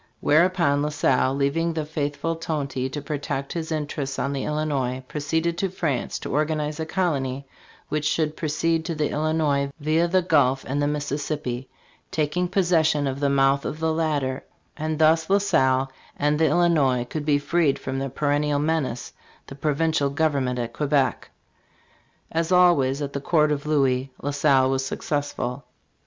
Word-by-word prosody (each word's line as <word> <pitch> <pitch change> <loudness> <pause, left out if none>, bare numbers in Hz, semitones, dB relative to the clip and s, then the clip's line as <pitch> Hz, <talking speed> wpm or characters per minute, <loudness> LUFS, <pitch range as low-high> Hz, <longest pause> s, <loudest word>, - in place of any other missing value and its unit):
Whereupon 165 -2 +3
La 150 - 0
Salle, 135 -3 +1
leaving 155 +5 0
the 160 -2 -2
faithful 150 +1 -2
Tonty 140 -5 -3
to 145 +2 -6
protect 140 -2 -3
his 165 -1 -4
interests 145 -3 -3
on 140 +2 -1
the 135 - -3
Illinois, 140 -4 -1
proceeded 160 +4 -1
to 195 - 0
France 155 -8 -2
to - - -6
organize 150 0 -1
a 160 - -3
colony 140 -7 -1 0.4
which 150 0 -2
should 155 0 0
proceed 160 +1 0
to 165 - -3
the 150 -1 -1
Illinois 150 -2 0
via 155 +3 +2
the 185 +1 +2
Gulf 135 -6 +2
and 140 +2 -1
the 145 - +2
Mississippi, 145 -3 -3 0.4
taking 160 +4 0
pos 185 0 0
session 160 -4 +3
of 135 0 -2
the 140 -1 +1
mouth 140 0 +3
of 155 - -4
the 160 0 +1
latter; 145 -5 -1 0.3
and 155 0 -2
thus 160 +1 +3
La 200 - +5
Salle 130 -9 +2 0.3
and 150 +1 +1
the 160 - +4
Illinois 150 -7 +2
could 150 +4 -5
be 145 -1 +3
freed 145 0 +1
from 130 0 -4
their 135 0 -3
perennial 145 +2 0
menace, 145 -5 -1 0.3
the - - -10
provincial 150 +1 0
government 140 -4 0
at 120 -1 -3
Quebec 140 -5 0 1.0
As 165 +1 -1
always 150 -7 +4
at 140 - -5
the 140 - -3
court 150 0 +2
of 145 0 -2
Louis, 135 -3 +1
La 145 - -3
Salle 140 -2 +3
was 135 0 0
successful. 140 -2 -3
150 Hz, 165 wpm, -24 LUFS, 135-160 Hz, 1.0 s, La